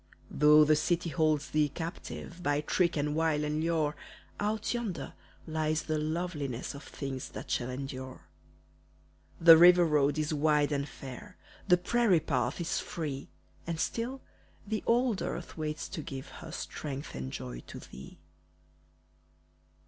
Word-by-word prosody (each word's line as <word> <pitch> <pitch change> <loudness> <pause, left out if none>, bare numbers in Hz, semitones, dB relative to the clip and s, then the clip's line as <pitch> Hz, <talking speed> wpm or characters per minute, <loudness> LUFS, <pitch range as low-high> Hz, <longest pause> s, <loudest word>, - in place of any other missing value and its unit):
Though 150 +1 +7
the 155 0 +5
city 170 +2 0
holds 155 -2 +1
thee 150 -1 +3
captive 170 +2 -7
By 145 -3 +1
trick, 170 +2 +1
and 150 +1 0
wile, 160 -2 +1
and 150 +1 -1
lure, 160 -2 +1 0.4
Out 210 +2 -1
yonder 205 - -4 0.3
lies 155 -1 0
the 155 -1 -1
loveliness 150 -6 -3
Of 140 - -8
things 135 -3 -5
that - - -8
shall 125 0 0
endure. 130 0 -6 1.2
The 165 -1 +10
river 175 0 +8
road 145 -2 +2
is 155 0 0
wide 150 0 +2
and 140 0 -1
fair, 140 +12 -10 0.3
The 180 -2 +6
prairie 215 -1 +3
path - - -1
is 170 -1 -1
free, 145 -5 -5 0.4
And 165 -1 -2
still 245 +8 -2 0.4
the 215 +1 -2
old 235 -3 +2
earth 175 - -4
waits 155 -1 -3
to 155 - -5
give 135 -1 -7
Her 165 -2 -10
strength 140 -1 -5
and 65 0 -5
joy - - -6
to - - -8
thee. 65 - -11
155 Hz, 145 wpm, -31 LUFS, 145-175 Hz, 1.2 s, The